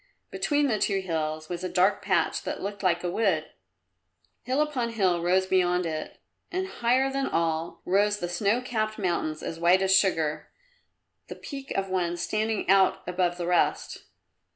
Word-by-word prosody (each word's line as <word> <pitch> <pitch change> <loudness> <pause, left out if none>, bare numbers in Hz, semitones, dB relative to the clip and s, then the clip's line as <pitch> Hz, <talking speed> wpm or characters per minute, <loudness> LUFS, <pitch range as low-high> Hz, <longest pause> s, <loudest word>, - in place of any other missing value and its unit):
Between 290 -1 +1
the 220 -5 0
two 195 -1 +1
hills 155 -3 -3
was 175 +1 -5
a 185 - -2
dark 185 +3 +2
patch 190 -4 +1
that - - -4
looked 200 0 -5
like 175 -2 +1
a 175 - -1
wood; 180 -7 0 0.9
hill 260 +4 -1
upon 265 -6 -1
hill 185 -6 +1
rose 185 +2 +2
beyond 180 -1 +2
it, 155 -1 -5 0.3
and 375 +1 -1
higher 260 -3 +1
than 275 0 -1
all 165 0 -2
rose 205 +3 +2
the 175 - -3
snow 200 +7 0
capped 215 -4 -2
mountains 170 -6 -2
as 165 - -5
white 180 +3 +4
as 190 0 +4
sugar, 165 -6 +1 0.8
the - - -7
peak 275 -2 -8
of 195 0 0
one 175 -2 -1
standing 215 +4 -1
out 190 0 +4
above 180 -1 0
the 175 - -3
rest. 175 0 0
190 Hz, 170 wpm, -27 LUFS, 175-215 Hz, 0.9 s, white